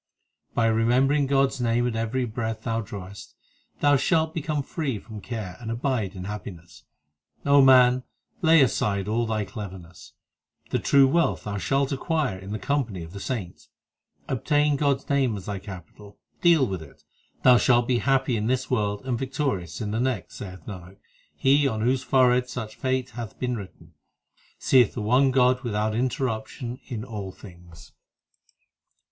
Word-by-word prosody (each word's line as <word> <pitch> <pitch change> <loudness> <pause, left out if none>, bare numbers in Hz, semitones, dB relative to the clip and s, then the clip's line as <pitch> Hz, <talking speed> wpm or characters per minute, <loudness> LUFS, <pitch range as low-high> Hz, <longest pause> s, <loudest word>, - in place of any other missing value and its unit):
By 115 - +2
remembering 125 +6 +3
God 135 0 +3
s 135 - -8
name 120 0 +1
at 120 - -3
every 115 +3 -1
breath 110 -1 -4
thou 115 -1 -1
drawest, 100 -1 -9 0.5
Thou 145 -1 +5
shalt 160 +3 +1
become 155 -3 -2
free 140 -6 -3
from 105 +1 -10
care 105 -7 -6
and 115 - -7
abide 115 -4 -2
in 90 - -6
happi 100 -1 -6
ness 85 +1 -17 0.6
O 140 0 +6
man, 130 -1 +6 0.4
lay 165 -3 +6
aside 100 -5 0
all 115 +2 0
thy 110 -2 -1
cleverness; 95 -3 -10 0.6
The - - +1
true 140 -1 +5
wealth 170 +5 +1
thou 100 -1 -4
shalt 135 - 0
acquire 140 - -1
in 95 +1 -9
the 110 - -2
company 115 -8 -2
of 80 +2 -11
the 100 - -7
saints. 100 -6 -5 0.6
Obtain 145 +3 +1
God 140 -1 +1
s - - -31
name 135 -6 +1
as 95 - -9
thy 100 -2 -4
capital, 100 +1 -11 0.2
deal 170 -6 +5
with 95 -7 -4
it, 70 -4 -15 0.3
And - - -35
thou 125 -1 +7
shalt 120 +2 +3
be 125 -2 +2
happy 135 -1 +1
in 110 0 -1
this 130 +1 -1
world 105 -2 -1
and 125 -3 -1
victorious 130 - -3
in 105 -2 -3
the 110 - -1
next 125 -6 -2
Saith 95 -4 -9
Nanak, 95 -1 -9 0.4
he 140 +1 +3
on 110 -5 -2
whose 125 +3 +1
forehead 125 -1 +3
such 110 -4 -5
fate 130 -1 -1
hath 115 -3 -7
been 125 -1 -2
written, 90 -6 -10 0.6
Seeth 125 -5 +4
the 115 - -3
one 130 +5 +4
God 130 0 +3
without 110 -3 -1
interruption 120 0 -3
in 110 -4 -5
all 105 -6 -6
things. 85 -3 -15
120 Hz, 170 wpm, -25 LUFS, 105-135 Hz, 0.6 s, thou